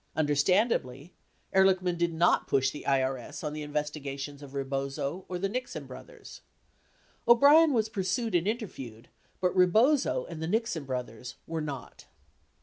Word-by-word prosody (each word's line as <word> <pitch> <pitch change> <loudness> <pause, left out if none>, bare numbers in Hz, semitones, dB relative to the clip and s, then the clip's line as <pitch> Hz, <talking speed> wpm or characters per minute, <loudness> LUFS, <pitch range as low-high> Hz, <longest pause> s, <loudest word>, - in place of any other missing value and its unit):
Understandably, 150 - +1 0.4
Ehrlichman 190 -2 +3
did 170 0 0
not 170 +2 +2
push 135 0 +2
the 150 - -9
IRS 135 +1 -1
on 150 -1 -3
the 155 - -5
investigations 145 -1 -4
of 140 -1 -11
Rebozo 140 +5 -3
or 180 - -3
the 195 +2 -1
Nixon 255 +5 -5
brothers. 480 -4 -12 0.9
O'Brien 285 +7 +7
was 225 -5 +1
pursued 210 +1 -2
and 175 +1 +2
interviewed, 135 - -5 0.3
but 180 -1 0
Rebozo 185 - +3
and 165 -2 -8
the 160 - -2
Nixon 220 -6 -1
brothers 125 -2 -5
were 165 -1 -3
not. 140 -4 -7
160 Hz, 140 wpm, -29 LUFS, 140-195 Hz, 0.9 s, O'Brien